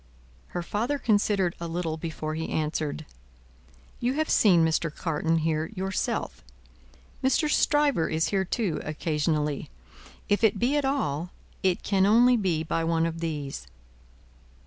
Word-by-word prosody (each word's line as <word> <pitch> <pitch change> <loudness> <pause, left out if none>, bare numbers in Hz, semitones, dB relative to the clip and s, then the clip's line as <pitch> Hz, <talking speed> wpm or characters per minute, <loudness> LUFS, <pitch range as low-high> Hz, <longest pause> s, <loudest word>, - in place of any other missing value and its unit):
Her 175 - -4
father 230 +11 -1
considered 205 -6 +1
a 170 - -4
little 165 -1 -2
before 155 -1 -4
he 160 +1 -4
answered: 155 0 -2 0.9
"You 245 +1 0
have 310 +2 -1
seen 175 -6 +5
Mr. 160 0 0
Carton 165 +1 -1
here, 160 0 0
yourself. 190 0 -2 0.8
Mr. 270 +4 +2
Stryver 290 - +2
is 160 +1 0
here 195 -2 +1
too, 190 -3 -1
occasionally. 150 -1 -1 0.6
If 205 +2 +1
it 215 -2 +4
be 245 +7 +1
at 290 -2 +1
all, 175 - -1 0.3
it 185 -2 +1
can 195 -1 +2
only 240 +4 +6
be 180 -8 0
by 165 +1 -1
one 165 0 +1
of 165 0 -3
these." 145 - -4
170 Hz, 140 wpm, -27 LUFS, 160-210 Hz, 0.9 s, only